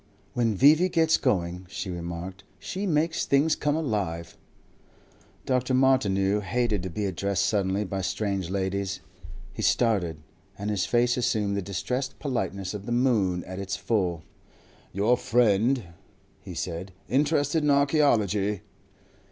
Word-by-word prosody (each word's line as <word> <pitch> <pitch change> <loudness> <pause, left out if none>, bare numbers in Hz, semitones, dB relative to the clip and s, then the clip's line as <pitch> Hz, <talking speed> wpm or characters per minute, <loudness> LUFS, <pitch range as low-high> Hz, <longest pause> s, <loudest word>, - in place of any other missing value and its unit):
"When 115 -3 +1
V.V. 155 - +5
gets 165 -2 +3
going," 90 -1 -1
she 95 - -5
remarked, 85 +2 -6
"she 195 +3 -4
makes 160 0 +1
things 145 +3 +3
come 145 0 0
alive." 95 - -2 1.1
Dr. 130 0 +1
Martineau 105 -7 +3
hated 110 0 0
to 95 - -4
be 105 +5 -3
addressed 100 +1 0
suddenly 100 -1 +1
by 95 0 -3
strange 95 -1 -2
ladies. 95 0 -2 0.5
He - - -5
started, 100 -10 +2 0.4
and 105 +1 -3
his 100 -3 0
face 120 +1 +2
assumed 105 -4 0
the 100 - -1
distressed 125 +8 -3
politeness 100 - -3
of 100 -1 -7
the - - -3
moon 110 -8 +2
at 95 +1 -7
its 100 0 -3
full. 90 -7 -1 0.7
"Your 105 +6 +2
friend," 120 +1 +2 0.6
he - - -9
said, 90 +2 -4
"interested 145 +2 +1
in 150 - +2
archaeology?" 115 - +2
105 Hz, 135 wpm, -26 LUFS, 95-130 Hz, 1.1 s, V.V